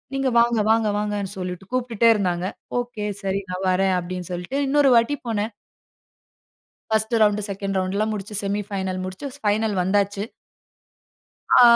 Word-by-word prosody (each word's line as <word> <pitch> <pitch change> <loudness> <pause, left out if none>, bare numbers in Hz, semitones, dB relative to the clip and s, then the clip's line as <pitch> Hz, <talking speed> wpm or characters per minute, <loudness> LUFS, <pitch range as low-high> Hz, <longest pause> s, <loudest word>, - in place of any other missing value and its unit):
நீங்க 270 -1 +1
வாங்க 235 -1 +3
வாங்க 225 -1 +3
வாங்கனு 205 -2 -2
சொல்லிட்டு 180 +1 -5
கூப்பிட்டுடே 235 -2 +2
இருந்தாங்க. 180 -3 0 0.3
ஒகே 240 -4 -4 0.2
சரி 195 0 0
நான் 185 +1 -3
வறேன் 190 0 +2
அப்டினு 180 0 -6
சொல்லிட்டு 180 +10 -4
இன்னொரு 285 0 +4
வாட்டி 235 +5 +3
போனேன். 220 0 -1 1.4
1ஸ்ட்டு 220 +1 +2
ரவுண்டு, 210 0 +3
2ண்டு 195 0 -2
ரவுண்டுலாம் 200 +4 0
முடிச்சு, 205 0 -5
செமி 200 +1 -1
ஃபைனல் 190 -2 -3
முடிச்சு 185 +9 -6
ஃபைனல் 215 -2 +1
வந்தாச்சு. 200 +2 +1 1.4
அ - - +9
205 Hz, 140 wpm, -23 LUFS, 190-225 Hz, 1.4 s, அ